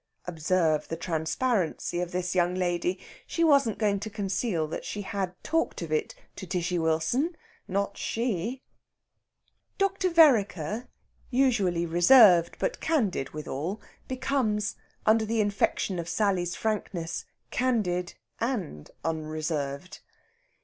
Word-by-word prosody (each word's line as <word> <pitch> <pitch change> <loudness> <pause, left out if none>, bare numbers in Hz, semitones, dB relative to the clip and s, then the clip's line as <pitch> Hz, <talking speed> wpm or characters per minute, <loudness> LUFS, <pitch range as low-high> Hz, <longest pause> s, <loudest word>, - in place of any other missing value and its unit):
Observe 165 -2 +1
the 165 - -4
transparency 175 +3 -1
of 175 -1 -3
this 180 -1 -2
young 180 0 +2
lady. 180 0 0 0.3
She 335 - 0
wasn't 280 -8 +4
going 205 -2 +1
to 220 +2 -5
conceal 195 -4 -1
that 155 - -5
she 205 - -5
had 190 -2 -3
talked 325 - -1
of 160 - -7
it 155 - -1 0.2
to 190 - -7
Tishy 175 -1 -1
Wilson 165 - 0 0.3
not 200 +1 -2
she! 230 +2 -2 1.1
Dr. 395 -1 +1
Vereker, 230 - +3 0.4
usually 225 -10 +2
reserved, 175 0 +6
but - - -2
candid 220 - 0
withal, 155 +6 -4 0.3
becomes, 250 -6 0 0.3
under 220 +1 +4
the 225 +1 -1
infection 200 -2 0
of 170 0 -4
Sally's 180 -2 0
frankness, 185 -6 -2 0.3
candid 195 -9 0 0.2
and 200 - -3 0.2
unreserved. 155 0 -3
190 Hz, 115 wpm, -28 LUFS, 170-230 Hz, 1.1 s, reserved